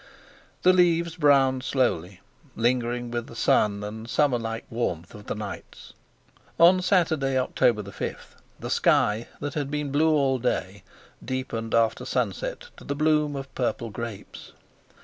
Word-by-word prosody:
The 185 - +6
leaves 170 -2 +3
browned 135 -5 +4
slowly, 110 - -1 0.3
lingering 120 0 0
with 120 -1 -3
the - - -12
sun 105 -2 +2
and 110 +2 -7
summer 135 -1 +2
like 115 0 -5
warmth 90 -8 -3
of 105 0 -12
the - - -2
nights. 105 -2 -8 0.7
On 180 +2 +7
Saturday, 160 -8 +2
October 120 -3 +1
5, 100 -2 -7 0.2
the - - -5
sky 110 +3 +2
that 145 - -3
had 145 -3 -2
been 150 -1 -3
blue 155 +3 +3
all 135 -4 +2
day 100 -5 -2 0.4
deepened 125 -3 -3
after 115 -1 +2
sunset - - -3
to - - -13
the 140 - -3
bloom 150 -1 +2
of 135 0 -7
purple 120 -2 -2
grapes. 115 0 -8
130 Hz, 145 wpm, -25 LUFS, 115-150 Hz, 0.7 s, On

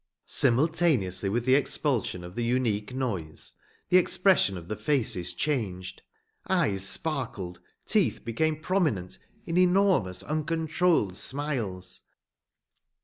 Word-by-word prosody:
Simultaneously 125 - +1
with 115 +4 -1
the 130 - +4
expulsion 135 - 0
of 90 0 -9
the 120 - -3
unique 115 -3 0
noise 100 -12 -5 0.4
the 180 - +6
expression 185 - +3
of 85 -1 -10
the 105 - -3
faces 110 - 0
changed. 95 - -3 0.5
Eyes 150 - +1
sparkled; 105 - -1 0.3
teeth - - 0
became 155 +7 0
prominent 155 - -1 0.3
in 170 +1 0
enormous, 180 - +2
uncontrolled 160 - 0
smiles. 110 -10 -3
125 Hz, 105 wpm, -27 LUFS, 95-160 Hz, 0.5 s, the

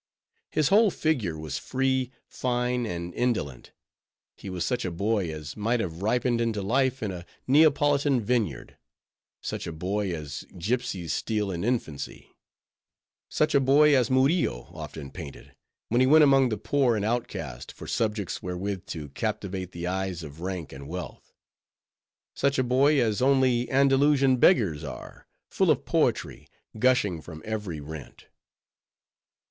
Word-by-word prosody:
His 155 -2 +1
whole 215 +2 +6
figure 125 - -1
was 75 -3 -4
free, 130 -1 0 0.2
fine, 125 -1 -1
and 85 -1 -5
indolent; 110 - -2 0.6
he 100 - -9
was 90 -2 -2
such 125 - -1
a 90 - -1
boy 100 0 -1
as 75 -2 -7
might 115 +3 0
have 85 -5 -4
ripened 120 +2 +1
into 110 -4 -1
life 130 +4 +1
in 105 - -2
a 90 -2 -7 0.2
Neapolitan 145 -1 +4
vineyard; 115 -1 -2 0.6
such - - -4
a - - -3
boy 95 +5 -2
as 75 -4 -5
gipsies 100 -4 -2
steal 105 -3 -1
in 85 -1 -3
infancy; 80 - -3 0.9
such 155 - +1
a - - +6
boy 140 +2 +5
as 125 -3 +2
Murillo 130 - +1
often 70 -4 -8
painted, 80 -6 -10 0.4
when 120 +3 +3
he 130 - +5
went 155 +3 +7
among 135 -3 +5
the 110 - -2
poor 130 +2 +1
and 105 -1 -1
outcast, 80 - -3
for - - -11
subjects 105 -4 -2
wherewith 90 +1 -4
to 75 -3 -6
captivate 95 +1 -3
the 85 0 -6
eyes 95 -1 -2
of 75 +1 -10
rank 90 -4 -4
and 70 +1 -9
wealth; 90 +1 -7 1.0
such 140 0 +1
a 130 - +3
boy, 135 +4 +3
as 110 -2 +1
only 130 -2 +3
Andalusian 135 0 +4
beggars 100 - +3
are, 70 - -9 0.2
full - - +2
of - - +2
poetry, - - 0 0.3
gushing 105 -9 +2
from 80 -1 -10
every 105 -7 -4
rent. 75 0 -9
110 Hz, 145 wpm, -27 LUFS, 85-130 Hz, 1.0 s, went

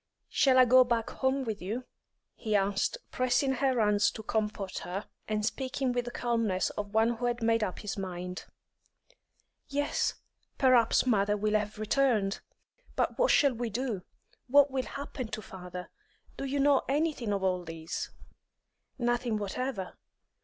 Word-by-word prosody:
"Shall 265 -2 +4
I 255 - +8
go 255 +1 +7
back 235 -2 -1
home 265 +1 0
with 220 -4 -4
you?" 220 +8 -4 0.5
he 215 -3 -2
asked, 200 - +1
pressing 255 +2 +2
her 265 -1 +1
hands 210 -1 +4
to 220 - -7
comfort 210 -3 -2
her, 195 +4 -5 0.2
and 215 -1 0
speaking 265 +2 -1
with 245 -1 -1
the - - -4
calmness 230 -6 0
of 205 0 -6
one 225 +1 +3
who 245 - -2
had 240 -1 -2
made 225 -1 +3
up 185 - -2
his 210 -1 -5
mind. 180 -1 -5 1.2
"Yes; 290 +1 0 0.4
perhaps 250 -4 +4
mother 210 -4 +2
will 210 +1 0
have 210 0 0
returned. 215 -2 +1 0.6
But - - 0
what - - +4
shall 280 -3 +5
we 235 0 -3
do? 230 -3 -2 0.5
What 285 +2 +5
will 260 -1 -1
happen 275 -3 -6
to 220 -1 -5
father? 180 -1 -8 0.4
Do - - -4
you 275 +1 -1
know 280 0 +4
anything 285 -6 0
of 200 -1 -1
all 185 -1 +1
this?" 165 -1 -5 0.9
"Nothing 240 -2 0
whatever. 210 0 -4
230 Hz, 155 wpm, -30 LUFS, 205-260 Hz, 1.2 s, I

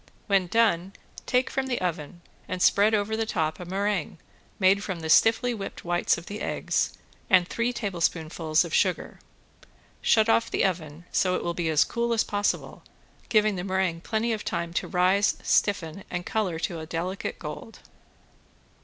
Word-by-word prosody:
When 195 -3 +2
done 195 -3 +2 0.3
take 250 +1 +1
from 265 0 -1
the 250 - -1
oven 170 -1 -4 0.3
and 185 - -3
spread 205 +4 +4
over 210 +1 0
the 225 0 -1
top 160 -6 -1
a 180 - -7
meringue 195 -1 -2 0.4
made 200 0 +3
from 185 -5 -4
the 160 0 -1
stiffly 225 +7 +4
whipped 200 -5 -7
whites 175 0 +1
of 170 - -9
the 205 +3 -7
eggs, - - -1 0.4
and 180 -2 +5
three 235 +4 -1
tablespoonfuls 165 -6 0
of 170 - -7
sugar. 185 -3 0 0.8
Shut 220 -1 +4
off 230 0 +3
the - - +1
oven 165 -3 -3
so 185 -1 +2
it - - -3
will 170 - -1
be 170 -1 -1
as 155 -2 +4
cool 235 0 -1
as 225 - +2
possible 205 0 -2 0.5
giving 215 -3 +3
the 180 - -3
meringue 185 -3 -1
plenty 225 +4 -1
of 215 - -4
time 170 0 -3
to - - -1
rise, 185 +3 +2
stiffen 195 -3 +1
and 180 0 -4
color 195 -7 -1
to 165 0 -3
a 160 - -7
delicate 175 +4 -4
gold. 155 +8 -8
185 Hz, 170 wpm, -26 LUFS, 170-215 Hz, 0.8 s, and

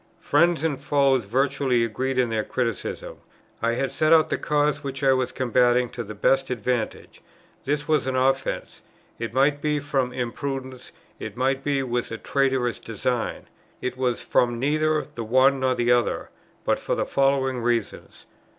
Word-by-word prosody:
Friends 170 +3 +2
and 150 -5 0
foes 140 -4 +2
virtually 130 +1 +1
agreed 130 +4 -2
in 125 -2 +2
their 110 -1 0
criticism; 115 -3 -3 0.4
I 115 0 +1
had 135 +3 -1
set 155 0 +1
out 160 -1 +6
the - - 0
cause 150 0 +1
which 135 0 -5
I 135 -1 +5
was 130 -1 0
combating 125 -1 +2
to 120 -1 -5
the 110 0 -8
best 135 0 +2
advantage: 120 -1 -3 0.4
this 150 +1 -1
was 150 -4 +2
an 130 - -1
offence; 135 +1 0 0.4
it 115 0 -3
might 140 +3 +2
be 150 0 0
from 135 -3 -1
imprudence, 130 +1 -5 0.3
it 110 +1 -7
might 135 +1 0
be 140 -1 0
with 120 -1 -2
a 115 - -5
traitorous 130 -2 0
design. 115 +2 -3 0.3
It 125 0 -3
was 125 -2 -1
from 120 -1 +1
neither 155 +4 +1
the 135 -6 -8
one 130 +4 +4
nor 130 -1 +1
the 120 0 +1
other; 120 -1 +1 0.3
but - - +1
for - - -2
the - - -1
following 135 -2 +1
reasons. 115 -2 -2
130 Hz, 170 wpm, -24 LUFS, 120-140 Hz, 0.4 s, out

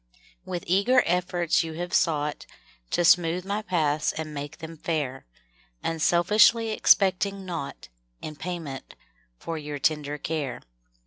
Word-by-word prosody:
% - - -32
W - - -4
ITH 175 - -4
eager 200 +8 +3
efforts 175 -1 +1
you 160 -1 -6
Have 175 +2 -5
sougkt 150 -3 0 0.4
To - - +1
smootk 175 +1 +4
my 200 +2 -2
paths 155 -7 0
and 155 -1 -6
make 145 0 -6
them 160 +1 -8
fair, 150 - -3 0.6
Unselfiskly 210 +7 +3
expect 190 -3 +4
5 200 -1 -2
mg 195 -1 -9
naugkt 170 - -6 0.3
In 155 - -7
payment 160 -5 -6 0.4
for 165 - -5
your 150 -1 -5
tender 150 0 0
care. 150 -3 -4
165 Hz, 145 wpm, -26 LUFS, 150-180 Hz, 0.6 s, smootk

